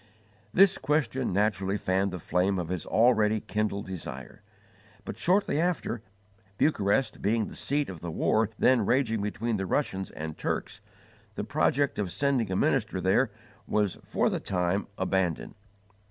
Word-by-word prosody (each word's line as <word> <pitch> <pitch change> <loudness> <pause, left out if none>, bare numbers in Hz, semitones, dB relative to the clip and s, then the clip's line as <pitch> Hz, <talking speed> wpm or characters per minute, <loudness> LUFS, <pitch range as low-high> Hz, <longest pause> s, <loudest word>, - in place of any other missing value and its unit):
This 195 0 +5
question 130 -3 0
naturally 100 0 +1
fanned 95 0 0
the 90 - -5
flame 90 +3 0
of 85 -2 -3
his 90 -2 -3
already 110 -2 +3
kindled 105 -1 -2
desire; 95 -3 -7 0.6
but, - - -5
shortly 175 - +2
after, 170 -10 -1 0.6
Bucharest 125 -3 +1
being 110 +2 +1
the - - -9
seat 140 +8 0
of 90 -4 -7
the 85 - -6
war 110 +6 +1
then 125 -3 +4
raging 115 -1 +1
between 105 +2 -2
the 95 -1 -3
Russians 95 -6 -1
and 80 0 -6
Turks, - - -3 0.5
the - - -3
project 140 -2 +1
of 95 -4 -1
sending 135 -6 0
a - - 0
minister 110 -5 +1
there 100 +7 +2 0.4
was 105 -3 0
for - - 0
the - - -1
time 90 +1 -1
abandoned. 95 -3 -1
105 Hz, 150 wpm, -28 LUFS, 95-125 Hz, 0.6 s, This